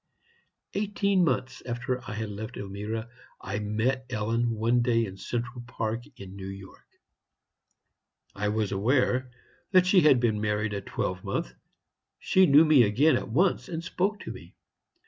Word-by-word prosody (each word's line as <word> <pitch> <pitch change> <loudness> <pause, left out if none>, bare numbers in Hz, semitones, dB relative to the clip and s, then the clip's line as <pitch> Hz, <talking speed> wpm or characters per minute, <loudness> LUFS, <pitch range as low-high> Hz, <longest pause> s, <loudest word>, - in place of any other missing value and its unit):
"Eighteen 200 -2 +1
months 130 -4 -1
after 125 +1 -3
I - - -4
had 110 -1 -4
left 105 +2 -7
Elmira, 105 +3 -5 0.3
I 100 +2 -4
met 115 +5 -1
Ellen 115 +1 0
one 115 +2 +1
day 115 -1 +2
in 95 -2 -8
Central 120 +4 -4
Park, 115 -1 -4
in 95 -1 -10
New 95 -1 -7
York. 95 -1 -11 1.5
I 105 +1 -1
was 105 -1 -1
aware 125 +5 +1 0.4
that 185 -1 +6
she 185 0 +5
had 150 -5 +5
been 110 -3 +1
married 105 0 -1
a 100 - -3
twelve 90 -1 -3
month. - - -3 0.6
She 185 -1 +4
knew 145 +2 +7
me 155 -4 +6
again 125 +8 +4
at - - -3
once, 175 +11 +1
and 165 -1 -4
spoke 200 +4 -1
to - - -6
me. - - -12
115 Hz, 155 wpm, -27 LUFS, 105-135 Hz, 1.5 s, knew